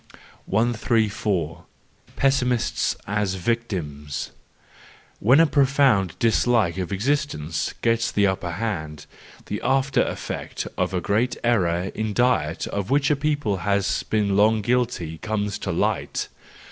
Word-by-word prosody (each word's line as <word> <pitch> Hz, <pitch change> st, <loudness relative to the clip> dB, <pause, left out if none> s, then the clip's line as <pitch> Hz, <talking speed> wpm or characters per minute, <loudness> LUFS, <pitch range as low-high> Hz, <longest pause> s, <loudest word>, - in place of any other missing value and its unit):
134. 105 Hz, -6 st, 0 dB, 0.5 s
Pessimists 125 Hz, -3 st, +1 dB
as 100 Hz, -1 st, -1 dB
Victims 85 Hz, -, -3 dB, 0.9 s
.—When 130 Hz, +8 st, +5 dB
a 165 Hz, -, +7 dB
profound 135 Hz, -, +3 dB
dislike 115 Hz, -5 st, +2 dB
of 90 Hz, 0 st, -3 dB
existence 100 Hz, -, -1 dB
gets 115 Hz, 0 st, +2 dB
the 100 Hz, -, +2 dB
upper 95 Hz, -3 st, -1 dB
hand, 80 Hz, -7 st, -4 dB, 0.4 s
the -, -, -4 dB
after 135 Hz, -1 st, +2 dB
effect -, -, -4 dB
of 95 Hz, -, -1 dB
a 90 Hz, -, 0 dB
great 110 Hz, +6 st, 0 dB
error 95 Hz, -6 st, +1 dB
in 110 Hz, -1 st, -2 dB
diet 120 Hz, -11 st, +1 dB
of 100 Hz, -1 st, -4 dB
which 140 Hz, +1 st, +2 dB
a -, -, +4 dB
people 145 Hz, -8 st, 0 dB
has 100 Hz, +2 st, 0 dB
been 105 Hz, -2 st, 0 dB
long 105 Hz, +1 st, +3 dB
guilty 115 Hz, -10 st, -1 dB
comes 105 Hz, -2 st, -2 dB
to -, -, -3 dB
light. -, -, -1 dB
105 Hz, 120 wpm, -23 LUFS, 95-125 Hz, 0.9 s, a